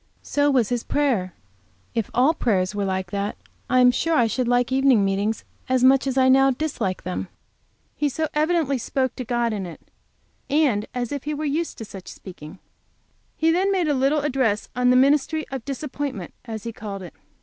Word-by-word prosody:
So 290 0 +1
was 255 -6 +2
his 245 -2 -1
prayer. 240 -12 0 0.6
If 225 -3 -1
all 265 +6 +3
prayers 195 - 0
were 205 -1 -1
like 190 -2 -2
that, 200 +1 -2 0.3
I 255 0 +4
am 250 0 +7
sure 330 +6 0
I 240 - +4
should 240 +2 -1
like 245 +1 +2
evening 260 -6 +4
meetings 200 +3 -1 0.3
as 255 -1 +2
much 270 +1 +5
as 265 0 -1
I 260 0 +5
now 270 +1 +6
dislike 250 -9 -2
them. 180 0 -4 0.7
He 295 - 0
so 315 +3 -1
evidently 305 -3 +1
spoke 260 +1 -1
to 255 - -3
God 240 -1 0
in 195 -3 -3
it, 165 - -13 0.6
and 275 -8 +2
as 245 -2 -2
if 285 -1 -4
he 300 0 -2
were 305 +1 -3
used 315 +4 -2
to 225 - -6
such 195 -3 -11
speaking. 175 -2 -10 0.8
He 320 +1 +3
then 375 +4 +2
made 365 -4 +1
a 295 - +2
little 275 +3 +2
address 255 -7 0
on 250 0 +3
the 250 - +5
ministry 290 +4 +3
of 265 -4 -5
disappointments, 275 - -5
as 220 -3 -6
he 230 - -5
called 200 -3 -7
it. 175 - -10
255 Hz, 195 wpm, -23 LUFS, 210-285 Hz, 0.8 s, am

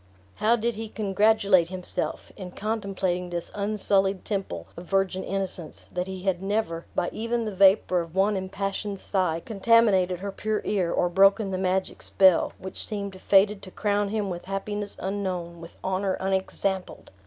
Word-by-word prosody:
How 220 +3 +4
did 235 +1 -1
he 220 0 -6
congratulate 205 -3 +3
himself, 185 -1 -2
in 180 -2 -8
contemplating 195 -4 -2
this 175 -1 -4
unsullied 200 -2 +1
temple 190 - -3
of 170 - -9
virgin 195 -1 0
innocence, 190 -4 -4
that 180 +1 -2
he 190 -1 -6
had 190 -2 0
never, 195 -5 -2
by 175 - 0
even 230 +1 -2
the 215 - -4
vapor 190 -2 +5
of 165 +1 -9
one 200 +2 +3
impassioned 195 +1 -3
sigh, 180 -5 -1
contaminated 205 -4 +3
her 200 0 -3
pure 215 +2 -2
ear, 185 -5 0
or 175 - +2
broken 195 +3 +4
the 185 - -2
magic 185 0 -1
spell, 190 -3 +4
which 190 - -5
seemed 200 -3 -5
fated 200 +1 +4
to 185 - -9
crown 205 +1 0
him 205 -2 -2
with 175 -1 -6
happiness 205 +2 -2
unknown, 180 -3 -3
with 170 - -12
honor 190 +1 0
unexampled! 190 0 -2
195 Hz, 160 wpm, -26 LUFS, 185-205 Hz, -, vapor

